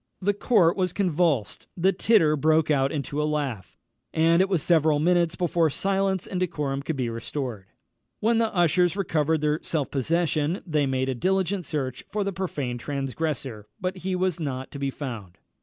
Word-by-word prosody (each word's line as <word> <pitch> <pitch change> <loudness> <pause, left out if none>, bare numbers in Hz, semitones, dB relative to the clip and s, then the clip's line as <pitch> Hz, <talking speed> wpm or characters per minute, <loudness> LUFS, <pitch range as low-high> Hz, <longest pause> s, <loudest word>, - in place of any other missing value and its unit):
The 205 +2 +1
court 195 -5 +3
was 185 -3 -1
convulsed; 170 - 0
the 185 +3 +3
titter 180 -6 +4
broke 155 +1 +2
out 135 -1 +2
into 145 0 -2
a - - 0
laugh; 140 - -3 0.3
and 165 +2 +4
it 190 - +2
was 175 -7 +1
several 160 -3 +3
minutes 170 +1 +2
before 170 -2 +1
silence 195 +3 0
and 185 - -4
decorum 150 -6 -2
could 155 +2 -3
be 130 -3 -1
restored. 115 -3 -5 0.5
When 225 +1 +2
the 225 -1 +1
ushers 175 0 +2
recovered 160 -4 +1
their 150 +1 +1
self 150 -5 -2
possession, 155 - 0
they 150 -5 +1
made 130 -1 -1
diligent 190 +1 0
search 130 -4 -3
for 210 -1 -1
the 200 0 -2
profane 145 -9 -3
transgressor; 135 -5 -3
but 185 +1 -3
he 185 +1 -2
was 180 -2 0
not 130 -4 -4
to 140 - -7
be 140 0 -1
found. 115 - -7
160 Hz, 175 wpm, -25 LUFS, 140-180 Hz, 0.5 s, titter